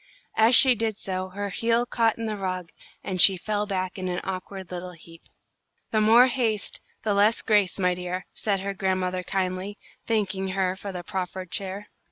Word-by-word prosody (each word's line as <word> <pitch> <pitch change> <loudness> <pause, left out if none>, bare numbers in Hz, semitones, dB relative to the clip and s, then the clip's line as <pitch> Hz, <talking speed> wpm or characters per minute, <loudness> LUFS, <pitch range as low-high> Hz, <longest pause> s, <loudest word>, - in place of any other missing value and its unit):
As 225 +3 +6
she 260 -2 +10
did 220 -2 -2
so, 185 -1 -4
her 200 +2 -4
heel 230 +4 +1
caught 230 -2 +1
in 230 - -4
the 215 -1 -2
rug, 185 -3 -4 0.3
and 185 -2 0
she 190 +1 +7
fell 210 +2 -2
back 185 -1 -3
in 185 - -3
an 180 -1 -2
awkward 190 0 -6
little 180 0 -6
heap. 165 0 -15 0.7
"The 215 - +2
more 230 +4 +7
haste, 240 -5 -1 0.2
the 210 - +1
less 205 +3 +3
grace, 205 -4 +2
my 180 -2 +2
dear," 180 +1 -5
said 200 -3 -1
her 200 0 -3
grandmother, 185 -2 -1
kindly, 185 +2 -3 0.3
thanking 195 -4 -1
her 185 -1 -1
for 200 +1 -7
the 180 -1 -6
proffered 185 -1 -5
chair. 200 +1 -3
195 Hz, 185 wpm, -25 LUFS, 185-215 Hz, 0.7 s, she